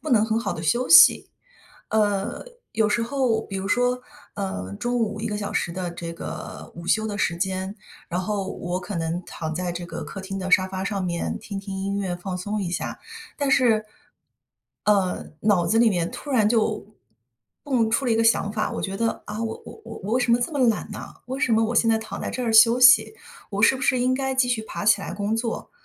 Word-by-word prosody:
不 310 - -4
能 225 -4 +5
很 220 0 +1
好 230 - -2
地 160 - -6
休 240 +10 +1
息。 330 -1 +8 0.6
呃， 205 - 0 0.3
有 220 0 +2
时 230 +3 +1
候 235 -2 0
比 195 - -5
如 190 0 -4
说， 245 +2 +1 0.3
呃， 100 - -4
中 245 - -2
午 215 -2 -1
1 - - -1
个 210 -1 -2
小 205 -1 -4
时 170 - -1
的 180 0 -4
这 170 -1 -6
个 165 - -8
午 170 0 -8
休 220 +4 +2
的 205 -2 -4
时 175 - 0
间， 190 +1 -2 0.3
然 175 +2 -1
后 195 0 -2
我 175 +1 -3
可 185 +2 -6
能 165 +2 -2
躺 160 -2 -5
在 180 0 -2
这 175 0 -6
个 165 -1 -6
客 195 - -7
厅 195 +1 -5
的 185 0 -4
沙 185 0 +4
发 190 0 -4
上 195 -1 -2
面 170 -1 -2
听 200 -3 -6
听 195 0 -7
音 195 +1 -2
乐， 190 -3 -2
放 180 +1 -5
松 205 +3 -3
一 175 - -3
下， 175 - -4 0.4
但 285 -2 0
是， 225 -5 +3 1.0
呃， 195 -3 +2 0.2
脑 200 -5 +2
子 225 - +2
里 235 0 +6
面 175 -3 -1
突 290 - -8
然 230 -6 +3
就， 220 -3 0 0.8
蹦 245 -6 +1
出 250 +5 +1
了 240 - +2
一 - - +2
个 225 - +3
想 225 -2 +3
法： 215 -1 -1
我 - - -4
觉 195 - -3
得， 230 +2 -1
啊， 215 +2 -4
我 225 -1 -4
我 - - -11
我 225 -1 -8
我 210 - -3
为 255 - +2
什 245 - +1
么 235 - +5
这 240 - -2
么 290 - -2
懒 220 - -1
呢？ - - -7 0.2
为 260 +2 -4
什 255 -2 +2
么 225 0 +4
我 230 +2 -2
现 230 0 +3
在 225 - +4
躺 220 0 -7
在 - - -3
这 255 - -4
儿 230 - 0
休 230 +2 +7
息？ 275 +10 +7 0.4
我 200 0 -2
是 230 - +6
不 - - -9
是 255 - +2
应 255 +1 +2
该 265 0 -1
继 260 -1 +3
续 240 -3 0
爬 220 - -6
起 210 -1 +5
来 175 - -5
工 205 +2 -1
作？ 230 0 -3
210 Hz, 255 characters per minute, -24 LUFS, 190-230 Hz, 1.0 s, 息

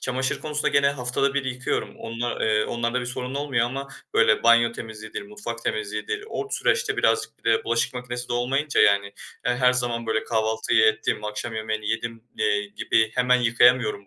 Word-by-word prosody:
çamaşır 130 0 -2
konusunda 150 -1 -1
gene 140 -1 +3
haftada 135 +1 -1
1 140 -2 0
yıkıyorum. 125 0 -3
Onla, 115 +1 -3
eee, 105 -1 +2
onlarda 120 +1 -1
bir 125 - -5
sorun 125 +1 -5
olmuyor, 135 -5 0
ama 135 +2 -5 0.3
böyle 110 - +4
banyo 115 0 +5
temizliğidir, 110 -2 -7
mutfak 105 +3 -7
temizliğidir. 105 - -3
O 410 - -4
süreçte 480 +3 0
birazcık - - +1
bir - - 0
de 450 - +1
bulaşık 265 - 0
makinesi 125 0 -5
de - - -2
olmayınca, 135 +5 +1
yani 100 0 +4 0.4
ya, 125 0 +2
her 125 0 +4
zaman 120 -2 -2
böyle 110 0 0
kahvaltıyı 110 -1 +2
ettim, 110 -1 0
akşam 105 +2 -4
yemeğini 110 -1 -3
yedim, 115 0 -3 0.2
eee, 105 -1 +1
gibi 110 +2 +1
hemen 125 0 +3
yıkayamıyorum 120 -3 +3
120 Hz, 175 wpm, -24 LUFS, 110-125 Hz, 0.4 s, banyo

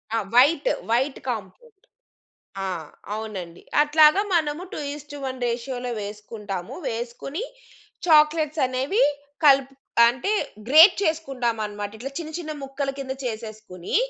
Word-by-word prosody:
ఆ! - - +2 0.2
White 320 - +5 0.2
white 260 +4 +1
compound. 235 - -6 0.9
ఆ! - - -2 0.5
అవునండి. 195 -6 -6 0.2
అట్లాగా 305 +5 +5
మనము 310 +1 0
2:1 285 -2 -6
రేషియో‌లో 245 +1 -3
వేసుకుంటాము. 205 -2 -6
వేసుకొని 240 - -4 0.6
చాక్లేట్స్ 305 0 +4
అనేవి 265 - +1 0.4
కలుపు 275 -1 +5 0.3
అంటే 260 - -1 0.4
గ్రేట్ 320 +7 +8
చేసుకుంటామన్నమాట. 235 - -2
ఇట్లా 270 +4 -6
చిన్న 315 -1 -6
చిన్న 310 -2 -5
ముక్కల 275 0 -3
కింద 265 -1 -4
చేసేసుకొని 215 -5 -6
265 Hz, 100 wpm, -24 LUFS, 225-300 Hz, 0.9 s, గ్రేట్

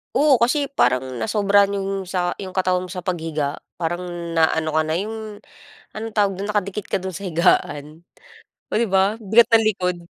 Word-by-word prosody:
Oo, 280 -1 +5
kasi 275 +5 +1
parang 130 - 0
nasobrahan 200 - +2
yung 195 -1 -3
sa 180 -1 -2
yung 190 -2 -7
katawan 185 -1 0
mo - - -11
sa 180 - -5
paghiga 160 -5 -3 0.2
parang 175 +2 -2 0.3
na-ano 160 0 +2
ka - - +4
na 155 - -2
yung 215 +3 -5 0.5
anong 220 0 -6
tawag 200 -1 +3
dun 200 +3 -5
nakadikit 205 -1 -2
ka - - +1
dun 190 -1 -6
sa 195 - -7
higaan. 155 -2 +1 0.7
Oh, - - 0
di 235 - +2
ba, 195 +2 +2
ang 215 -4 -13
bigat 235 +1 +7
ng 225 -1 +4
likod. 180 -4 0
190 Hz, 185 wpm, -21 LUFS, 175-210 Hz, 0.7 s, bigat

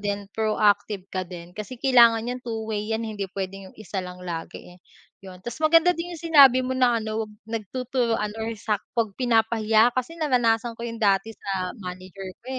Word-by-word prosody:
din 205 0 -3
proactive 210 -2 +1
ka 185 - -1
din. 175 -1 -10
Kasi 210 +6 -7
kailangan 235 -3 +5
niyang 250 +1 -4
two-way 220 -3 -4
yan. 230 - -4
Hindi 205 -3 -4
pwedeng 195 0 -5
'yong - - -25
isa 210 -2 -5
lang 180 0 -9
lagi 170 0 -7
eh, - - -23 0.4
'yon. 185 -2 -12
Tas 240 +6 -6
maganda 330 +3 +5
din 345 0 -6
yung 320 - -13
sinabi 265 -4 +8
mo 255 - -2
na 250 -2 +3
ano, 220 0 -3
'wag - - -16
nagtuturuan 225 0 -2
or 220 - -2
sak 210 -1 -1 0.2
pag 225 -3 +1
pinapahiya 225 -1 +3
kasi 255 +7 -3
naranasan 240 -6 +1
ko - - -10
'yon 230 0 -5
dati 200 +2 +2
sa 185 -2 -3
manager 185 -1 -8
ko, - - -42
220 Hz, 185 wpm, -25 LUFS, 195-245 Hz, 0.4 s, sinabi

